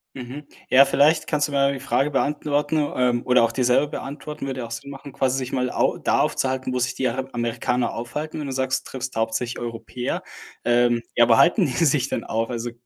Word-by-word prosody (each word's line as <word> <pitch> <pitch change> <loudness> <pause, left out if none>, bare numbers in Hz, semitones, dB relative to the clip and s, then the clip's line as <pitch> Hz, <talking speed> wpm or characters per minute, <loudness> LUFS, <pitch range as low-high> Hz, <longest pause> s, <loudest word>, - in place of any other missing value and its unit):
Mhm. 135 +3 -8 0.2
Ja, 135 +2 +7
vielleicht 150 +3 +3
kannst 150 -1 +1
du - - -9
mir 140 - 0
ja - - +2
die 135 - -6
Frage 140 +2 +1
beantworten, 145 +2 0 0.2
ähm, 125 -1 +1
oder 125 -1 +4
auch 115 - +2
dir 125 +1 0
selber 125 +4 +3
beantworten. 145 0 -6
Würde 130 -1 -4
ja - - -4
auch - - -14
Sinn 115 +5 -6
machen, 140 -1 -10
quasi 135 -1 0
sich 130 -1 -4
mal 125 -1 0
au - - +1
da - - +1
aufzuhalten, 130 -1 -1
wo 125 - 0
sich 125 +1 -1
die 130 - 0
Ara 130 +2 -3
Amerikaner 120 0 -1
aufhalten, 150 +7 -5
wenn 150 - -4
du 135 - -4
sagst, 130 0 -1
du - - -12
triffst 130 0 -5
hauptsächlich 115 +2 -1
Europäer. 120 +1 -4 0.4
Ähm, 120 0 +3
ja, 120 -1 +5
wo 115 - +6
halten 175 +3 +5
die 140 - -1
sich 135 -3 +2
denn 115 - -2
auf? 115 0 -2
Also, 120 -1 -4
130 Hz, 230 wpm, -23 LUFS, 120-140 Hz, 0.4 s, Ja